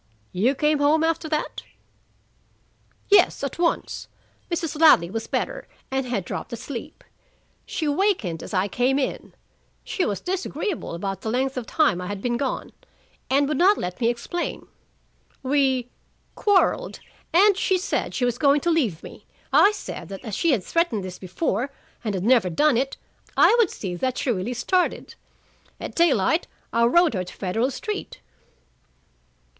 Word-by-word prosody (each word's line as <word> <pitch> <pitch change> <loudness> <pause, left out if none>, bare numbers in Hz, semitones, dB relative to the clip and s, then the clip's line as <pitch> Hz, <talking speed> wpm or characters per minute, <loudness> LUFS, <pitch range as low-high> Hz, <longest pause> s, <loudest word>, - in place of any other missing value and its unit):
"You 235 +10 +1
came 300 +1 +2
home 300 +2 +3
after 325 -1 0
that?" 305 -1 -2 1.5
"Yes, 385 -7 +5
at 280 +4 -4
once. 340 -1 -1 0.4
Mrs. 330 -3 -3
Ladley 180 - +6
was 225 +1 -4
better - - -3 0.2
and 265 -1 -1
had 205 -7 -2
dropped - - -5
asleep. 235 +1 -7 0.6
She 315 - -2
wakened 290 - 0
as - - -8
I 190 -1 +1
came 250 +5 +1
in. 275 - -3 0.5
She 375 - -2
was 205 - -1
disagreeable 375 - -3
about 195 +2 -4
the 220 - -3
length 260 +3 0
of 250 -3 -4
time 300 - +2
I 180 - -5
had 205 0 -4
been 240 +4 -1
gone, 260 +2 -3 0.6
and 280 +1 +3
would 305 - -1
not 390 +4 +5
let 180 +6 -5
me 230 - +3
explain. 240 +9 -4 0.8
We 265 -2 +1 0.4
quarreled, 415 +5 +2 0.3
and 400 +4 +5
she 380 0 +1
said 370 +3 -2
she 250 - +1
was 245 0 -1
going 280 +1 +4
to 345 - +1
leave 235 - 0
me. - - -12 0.3
I 405 - +7
said 420 - -7
that 195 +5 -8
as 215 - -6
she 335 - +1
had 225 -9 +1
threatened 300 - 0
this 185 -1 -7
before 210 - -2 0.3
and 210 -4 -2
had 185 - -2
never 235 -4 +4
done 290 - +3
it, 270 +3 -1 0.4
I - - +6
would 445 -7 +4
see 185 -4 -5
that 255 +5 -1
she 255 - 0
really 225 +4 -2
started. 360 +10 0 0.7
At - - -6
daylight 320 - +2 0.3
I 235 0 +4
rowed 345 +5 +4
her 185 -3 -1
to 180 - -10
Federal 220 +7 0
Street." 405 - -5
265 Hz, 160 wpm, -24 LUFS, 220-330 Hz, 1.5 s, I